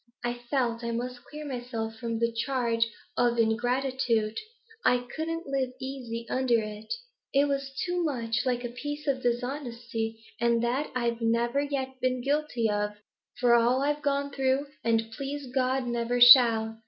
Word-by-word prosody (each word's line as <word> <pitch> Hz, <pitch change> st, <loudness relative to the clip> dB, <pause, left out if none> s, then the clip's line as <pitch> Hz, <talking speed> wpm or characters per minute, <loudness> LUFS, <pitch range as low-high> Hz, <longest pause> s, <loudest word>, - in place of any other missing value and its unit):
I 240 Hz, 0 st, 0 dB
felt 240 Hz, -1 st, -1 dB
I 235 Hz, -, -2 dB
must 245 Hz, +1 st, -4 dB
clear 300 Hz, 0 st, -8 dB
myself 240 Hz, -4 st, -4 dB
from 230 Hz, 0 st, -3 dB
the 230 Hz, 0 st, 0 dB
charge 230 Hz, -1 st, +1 dB, 0.3 s
of 240 Hz, -1 st, +2 dB
in 225 Hz, -1 st, +3 dB
gratitude; 245 Hz, -3 st, 0 dB, 0.5 s
I 245 Hz, 0 st, +3 dB
couldn't 330 Hz, +1 st, -3 dB
live 270 Hz, -2 st, -1 dB
easy 250 Hz, -4 st, -5 dB
under 255 Hz, -2 st, +2 dB
it. 215 Hz, 0 st, -7 dB, 0.4 s
It 280 Hz, +1 st, +5 dB
was 275 Hz, -1 st, -2 dB
too 355 Hz, -1 st, 0 dB
much 235 Hz, -7 st, -1 dB
like 250 Hz, -1 st, 0 dB
a -, -, -3 dB
piece 290 Hz, +5 st, -5 dB
of 270 Hz, -3 st, 0 dB
dishonesty, 240 Hz, -3 st, -2 dB, 0.2 s
and 235 Hz, -1 st, +2 dB
that 255 Hz, +5 st, 0 dB
I've 235 Hz, -1 st, -1 dB
never 235 Hz, +4 st, +1 dB
yet 265 Hz, -2 st, -3 dB
been 255 Hz, -1 st, +1 dB
guilty 280 Hz, -5 st, 0 dB
of, 210 Hz, 0 st, -1 dB, 0.5 s
for 245 Hz, -3 st, +4 dB
all 240 Hz, +3 st, +4 dB
I've 295 Hz, +1 st, 0 dB
gone 280 Hz, -1 st, 0 dB
through, 270 Hz, 0 st, +1 dB, 0.2 s
and, 225 Hz, -1 st, +1 dB
please 275 Hz, +4 st, -5 dB
God, 260 Hz, 0 st, +1 dB
never 240 Hz, 0 st, -1 dB
shall. 230 Hz, -3 st, +8 dB
245 Hz, 160 wpm, -28 LUFS, 230-270 Hz, 0.5 s, shall